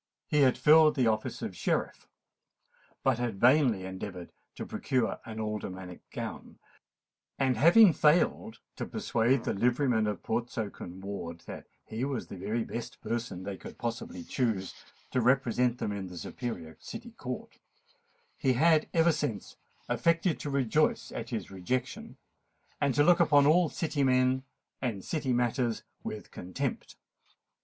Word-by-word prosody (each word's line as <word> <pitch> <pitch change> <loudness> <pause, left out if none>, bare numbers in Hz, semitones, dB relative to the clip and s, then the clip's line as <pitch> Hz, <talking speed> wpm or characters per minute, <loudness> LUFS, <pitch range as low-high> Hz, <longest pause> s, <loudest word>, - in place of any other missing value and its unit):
He 150 - +1
had 130 -2 +4
filled 155 0 +6
the 130 -4 +2
office 110 -1 -1
of - - -4
Sheriff, - - -2 1.0
but 130 -3 +2
had 115 -5 -2
vainly 125 -6 +4
endeavoured 95 -1 -7 0.2
to - - -5
procure 125 -4 -1
an 110 -1 -7
aldermanic 95 -4 -5
gown; - - -7 0.8
and, 130 -2 +2
having 170 - +7
failed 175 +9 +2 0.2
to - - -4
persuade 125 - +1
the - - -1
livery 125 +7 +2
men 110 -4 +2
of 105 - -3
Portsoken 110 -5 -4
Ward 85 -4 -6
that - - -8 0.2
he 110 +3 -4
was 135 -3 -2
the - - -9
very 110 +5 -2
best 120 +1 -6
person 115 -6 -3
they 100 0 -5
could - - -11
possibly 115 -6 -4
choose 110 -6 -1 0.4
to 130 - +1
represent 125 -1 +2
them 105 - -2
in 100 -2 -4
the 90 -1 -9
superior 85 -7 -6
City - - -8
Court, - - -7 0.8
he 130 - +3
had 155 +4 +4
ever 165 +1 +5
since 145 - -3 0.3
affected 170 0 +1
to 145 - -4
rejoice 140 +2 +1
at 115 0 -5
his 110 -7 -4
rejection, 95 +7 -3 0.6
and 140 -3 +2
to 145 - +5
look 175 +3 +5
upon 145 -4 +5
all 165 +2 +5
City 155 -2 -2
men 130 0 +3 0.4
and 110 -7 -3
City 145 -5 -1
matters 120 -1 0 0.2
with 110 - -7
contempt. 90 0 -4
120 Hz, 150 wpm, -30 LUFS, 105-140 Hz, 1.0 s, having